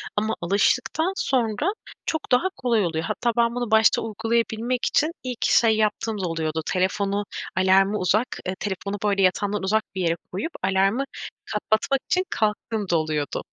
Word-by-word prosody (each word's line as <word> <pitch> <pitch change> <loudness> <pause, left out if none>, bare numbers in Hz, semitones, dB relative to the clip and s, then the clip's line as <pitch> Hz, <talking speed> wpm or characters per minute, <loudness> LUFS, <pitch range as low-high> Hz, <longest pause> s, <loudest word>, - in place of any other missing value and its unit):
ama 215 +1 0
alıştıktan 250 - +1
sonra 265 - 0 0.3
çok 315 - -3
daha 250 +9 +4
kolay 230 -5 +1
oluyor. 160 -1 -2
Hatta 235 +8 0
ben 235 0 +2
bunu 245 -2 -3
başta 220 0 +5
uygulayabilmek 225 +2 -1
için 310 +2 +2
ilk 250 -2 -3
şey 225 -2 +4
yaptığım 215 0 0
da 180 - -1
oluyordu. 160 -1 -2
Telefonu 200 +2 0 0.3
alarmı 195 +2 +4
uzak, 210 +7 +2 0.2
eee, 185 - -2
telefonu, 200 0 -3
böyle, 200 -2 +2
yatağımdan 200 +2 +1
uzak 215 +3 +2
bir 190 - -2
yere 165 -1 +1 0.2
koyup 200 - -3
alarmı 195 +6 +2 0.4
kapatmak 220 +5 0
için 365 - +2
kalktığım 210 -1 -1
da 170 - +3
oluyordu. 155 -2 -2
210 Hz, 155 wpm, -24 LUFS, 190-235 Hz, 0.4 s, başta